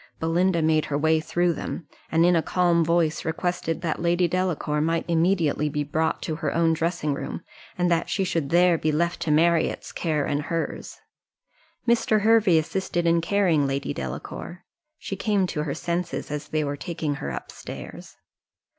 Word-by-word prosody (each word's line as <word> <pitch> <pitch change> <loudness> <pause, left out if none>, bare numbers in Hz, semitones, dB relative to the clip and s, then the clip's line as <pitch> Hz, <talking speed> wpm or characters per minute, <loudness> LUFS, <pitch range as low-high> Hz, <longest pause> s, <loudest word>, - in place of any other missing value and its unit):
Belinda 170 +1 +1
made 155 -1 +3
her 145 - -1
way 160 +1 +3
through 175 +2 +1
them, 160 +1 -6 0.2
and, 165 +1 +4
in 175 0 +4
a 165 - +3
calm 175 -1 +2
voice, 165 -1 +1
requested 165 0 -2
that 165 -2 -2
Lady 175 +1 +2
Delacour 170 -4 -1
might 165 +2 0
immediately 165 -3 +2
be 150 0 -1
brought 160 +2 -1
to 155 - -3
her - - -2
own 165 -1 +3
dressing 165 -2 -1
room, - - -5 0.3
and 180 -1 +1
that 170 0 +1
she 195 - 0
should 165 -6 -1
there 175 0 +4
be 155 - +1
left 170 +3 0
to 165 - -3
Marriott's 165 +2 +2
care 155 -4 -1
and 145 0 -1
hers. 165 0 -4 0.9
Mr. 225 -2 +3
Hervey 215 -5 +5
assisted 175 +1 -1
in 170 0 +3
carrying 165 -5 +2
Lady 135 0 -2
Delacour 65 - -7 0.3
she 195 - -5
came 200 -1 +1
to 165 -4 -3
her 140 - -3
senses 175 -2 -3
as 150 0 -4
they 155 0 -1
were 145 0 -2
taking 160 -2 -3
her - - -3
up 60 - -6
stairs. - - -9
165 Hz, 175 wpm, -25 LUFS, 155-175 Hz, 0.9 s, Hervey